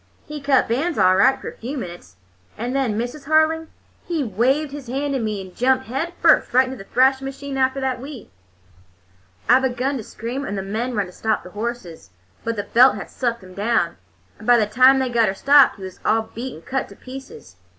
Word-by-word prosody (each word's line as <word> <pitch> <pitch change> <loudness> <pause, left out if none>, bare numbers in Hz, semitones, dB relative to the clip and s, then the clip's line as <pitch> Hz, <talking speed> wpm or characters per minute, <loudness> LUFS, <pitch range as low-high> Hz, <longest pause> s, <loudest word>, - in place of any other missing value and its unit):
He 300 -1 -7
cut 275 -1 +3
bands 290 +9 -1
all 185 0 +5
right 265 +8 +4
for - - -8
a - - -14
few 265 +6 -5
minutes, 175 - -8 0.4
and 245 +4 -3
then, 250 -6 0
Mrs. 245 +5 -4
Harling, 315 +1 +2 0.4
he 330 -4 -1
waved 260 +7 0
his 285 -3 -8
hand 280 +3 -2
to 270 - 0
me 215 -3 -2
and 185 -1 -12
jumped 260 +1 +2
head 275 +9 -3
first 325 - +5
right 260 +1 +6
into 260 +1 -6
the 195 - -12
thrashing 265 +1 +3
machine 275 +1 -6
after 265 0 +1
the 265 -1 0
wheat. 255 -1 -9 1.2
"I 250 +2 +6
begun 265 +1 -1
to 230 - -6
scream, 240 +6 -5
and 200 -6 -4
the 195 - -3
men 230 +5 -3
run 205 -2 0
to 180 - -12
stop 220 +3 -1
the 180 - -11
horses, 210 - -6 0.3
but 230 0 -2
the 205 - -3
belt 250 +5 +5
had - - -8
sucked 235 -4 -2
him 185 0 -13
down, 205 -4 0 0.4
and 215 - -11
by 245 0 +7
the 220 - +3
time 255 +5 +5
they 260 -1 0
got 235 -2 +2
her 190 - -1
stopped 280 +5 +5
he 195 - -12
was 185 -1 -9
all 220 0 +1
beat 250 +3 -6
and 160 - -14
cut 265 0 -2
to - - -13
pieces. 255 - -11
250 Hz, 225 wpm, -21 LUFS, 215-270 Hz, 1.2 s, by